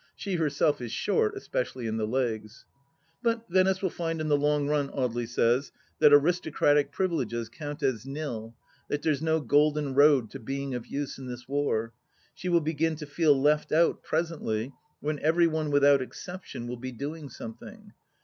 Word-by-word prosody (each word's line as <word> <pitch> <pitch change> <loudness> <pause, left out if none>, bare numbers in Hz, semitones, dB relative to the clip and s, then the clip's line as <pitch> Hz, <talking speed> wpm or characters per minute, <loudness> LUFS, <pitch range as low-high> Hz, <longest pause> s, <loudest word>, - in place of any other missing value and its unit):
She 200 - -4
herself 150 -2 +1
is 120 -2 -5
short, 435 - 0
especially 400 - -3
in 110 0 -2
the 110 -1 -1
legs. 115 -2 -2 0.6
But 230 -1 0
Venice 185 +1 +2
will 190 - +1
find 165 -1 -3
in 155 0 -2
the 145 - +5
long 145 0 +1
run, 145 -1 +1
Audely 120 -3 -2
says, 120 +3 +1 0.3
that 150 - +7
aristocratic 145 -2 +3
privileges 125 - -1
count 145 +3 -7
as 130 -4 0
nil; 130 -5 -5 0.3
that 145 - -2
there's 150 -3 +1
no 160 0 +2
golden 145 0 +2
road 140 -4 +5
to 135 - -7
being 135 +3 -4
of 125 -2 -5
use 140 -1 -4
in 130 - -7
this 125 0 -8
war.... 125 -5 -1 0.4
She 180 - -5
will 170 -1 +4
begin 160 +1 0
to 150 0 -7
feel 145 -1 +3
left 150 +2 +2
out, 165 +2 +3
presently, 150 -7 -2 0.3
when 150 0 -2
every 165 +3 +3
one, 160 -2 0
without 145 -1 +5
exception, 180 -1 -7
will 125 +1 -5
be 130 +2 -6
doing 145 +4 -6
something. 115 -2 -10
145 Hz, 175 wpm, -28 LUFS, 125-160 Hz, 0.6 s, that